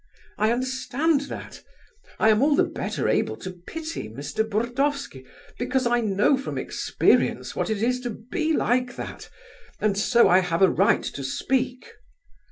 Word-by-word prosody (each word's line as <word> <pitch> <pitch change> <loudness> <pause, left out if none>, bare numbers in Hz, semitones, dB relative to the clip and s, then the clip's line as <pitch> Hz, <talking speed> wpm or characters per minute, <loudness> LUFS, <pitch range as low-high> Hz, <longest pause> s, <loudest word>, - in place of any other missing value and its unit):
I 215 +2 +3
understand 260 +5 0
that. - - -8 0.6
I 220 - +4
am 215 +1 +4
all 290 +1 +4
the - - +4
better - - -3
able - - +1
to 185 - -7
pity 185 - -7
Mr. 140 - -3
Burdovsky, 235 - -2 0.3
because 255 +1 0
I 240 0 +2
know 210 +5 +2
from 270 - -5
experience - - +1
what - - -1
it 215 -1 -1
is 250 +1 +1
to 245 -1 -4
be 310 - -3
like 250 -4 +1
that, - - -8 0.5
and 210 -2 +1
so 235 +4 +4
I 180 - +6
have 180 -1 0
a 185 - +6
right 200 +5 +3
to 140 - -5
speak. 255 - -1
240 Hz, 160 wpm, -25 LUFS, 200-260 Hz, 0.6 s, I